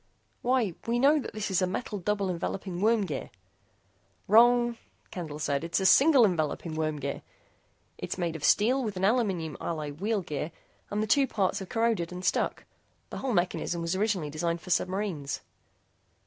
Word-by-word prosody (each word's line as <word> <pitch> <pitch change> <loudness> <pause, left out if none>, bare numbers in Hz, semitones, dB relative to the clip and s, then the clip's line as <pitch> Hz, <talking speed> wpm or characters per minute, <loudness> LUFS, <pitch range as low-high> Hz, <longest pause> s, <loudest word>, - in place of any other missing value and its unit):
"Why 250 -4 +2
why - - -16
we 235 +1 +1
know 285 +5 +5
that - - -6
this 215 -2 -3
is 190 - +2
a 185 - +2
metal 205 +2 -4
double 200 0 -1
enveloping 180 +1 -4
worm 220 -1 +3
gear." 150 -7 -5 1.0
"Wrong," 240 +2 +5 0.4
Candle 160 -5 -6
said. 140 -1 -1
"It's 170 +3 0
a 190 - -1
single 270 +4 +7
enveloping 165 -3 -1
worm 155 -1 -1
gear. 140 0 -4 0.8
It's - - -4
made 170 -3 -2
of 155 - -7
steel 250 - +3
with 210 -5 -4
an 190 - +1
aluminum 195 - +1
alloy 155 -3 -3
wheel 200 +6 -1
gear 150 0 -4 0.4
and 210 +1 -1
the - - 0
two 270 +5 +3
parts 195 -6 0
have 190 - -8
corroded 225 -8 0
and 180 +1 -6
stuck. - - 0 0.5
The - - -5
whole 265 -2 -2
mechanism 175 -2 0
was 170 +2 -1
originally 190 -7 0
designed 170 +2 -2
for 180 - -7
submarines." 185 -6 -1
190 Hz, 175 wpm, -28 LUFS, 165-225 Hz, 1.0 s, single